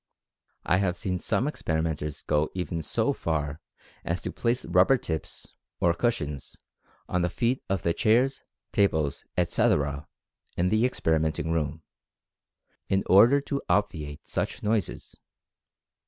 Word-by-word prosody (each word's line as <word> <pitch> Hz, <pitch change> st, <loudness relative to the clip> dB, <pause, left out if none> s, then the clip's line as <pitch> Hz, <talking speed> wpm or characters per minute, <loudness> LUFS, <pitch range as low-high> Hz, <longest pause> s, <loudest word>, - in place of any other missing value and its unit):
I 90 Hz, -, +3 dB
have 95 Hz, -2 st, 0 dB
seen 95 Hz, -5 st, -2 dB
some 120 Hz, -, 0 dB
experi 80 Hz, -, -1 dB
menters 75 Hz, -2 st, -3 dB, 0.3 s
even 90 Hz, -2 st, -3 dB
go -, -, -3 dB
so 75 Hz, -, 0 dB
far 75 Hz, -2 st, -2 dB, 0.4 s
as 85 Hz, +2 st, -1 dB
to -, -, -3 dB
place 120 Hz, +1 st, -1 dB
rubber 135 Hz, -, +4 dB
tips, 80 Hz, -9 st, -6 dB, 0.3 s
or 85 Hz, -, +3 dB
cushions, 75 Hz, -, -2 dB, 0.5 s
on 90 Hz, -, 0 dB
the 90 Hz, -, +1 dB
feet 120 Hz, +7 st, 0 dB
of 95 Hz, -3 st, -1 dB
the 85 Hz, -, +2 dB
chairs, 125 Hz, +6 st, +2 dB, 0.3 s
tables, 80 Hz, -8 st, +1 dB
etc., 75 Hz, -4 st, +1 dB, 0.5 s
in 90 Hz, +1 st, +2 dB
the 110 Hz, +4 st, +3 dB
experimenting 80 Hz, -, 0 dB
room, 80 Hz, -1 st, -1 dB, 1.1 s
in 95 Hz, 0 st, +2 dB
order 115 Hz, +9 st, +6 dB
to 140 Hz, 0 st, -3 dB
obviate 80 Hz, -8 st, -1 dB
sudden -, -, -3 dB
noises. 105 Hz, -3 st, -1 dB
85 Hz, 130 wpm, -27 LUFS, 80-110 Hz, 1.1 s, order